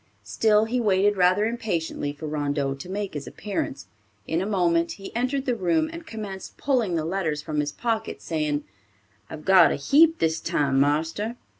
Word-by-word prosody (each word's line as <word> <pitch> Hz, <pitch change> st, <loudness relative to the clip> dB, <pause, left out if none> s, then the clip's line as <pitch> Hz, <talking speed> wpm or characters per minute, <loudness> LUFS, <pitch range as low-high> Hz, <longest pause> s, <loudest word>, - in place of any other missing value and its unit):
Still 210 Hz, -, +3 dB
he 245 Hz, +3 st, -1 dB
waited 205 Hz, -2 st, +3 dB
rather 185 Hz, +3 st, +3 dB
impatiently 190 Hz, -10 st, -2 dB
for 145 Hz, +2 st, -9 dB
Rondeau 145 Hz, -2 st, -1 dB
to 135 Hz, +6 st, -9 dB
make 200 Hz, 0 st, -3 dB
his 145 Hz, -2 st, -6 dB
appearance. 195 Hz, -9 st, -4 dB, 0.4 s
In 160 Hz, +7 st, -1 dB
a 190 Hz, -, -2 dB
moment 170 Hz, -4 st, +1 dB
he 195 Hz, +1 st, -10 dB
entered 260 Hz, +3 st, -1 dB
the 250 Hz, -, +1 dB
room, 240 Hz, -, +1 dB
and 335 Hz, -1 st, -9 dB
commenced 205 Hz, -5 st, -7 dB
pulling 245 Hz, -10 st, +1 dB
the 160 Hz, -1 st, -1 dB
letters 160 Hz, -4 st, -2 dB
from 150 Hz, -1 st, -2 dB
his 145 Hz, 0 st, -1 dB
pocket, 225 Hz, +2 st, -2 dB
saying, 150 Hz, -3 st, -2 dB, 0.7 s
"I've 155 Hz, -1 st, -9 dB
got 190 Hz, -3 st, +7 dB
a -, -, 0 dB
heap 315 Hz, -, +4 dB
this 160 Hz, 0 st, +1 dB
time, 140 Hz, -2 st, +1 dB
marster." 160 Hz, -, 0 dB
185 Hz, 175 wpm, -25 LUFS, 155-220 Hz, 0.7 s, got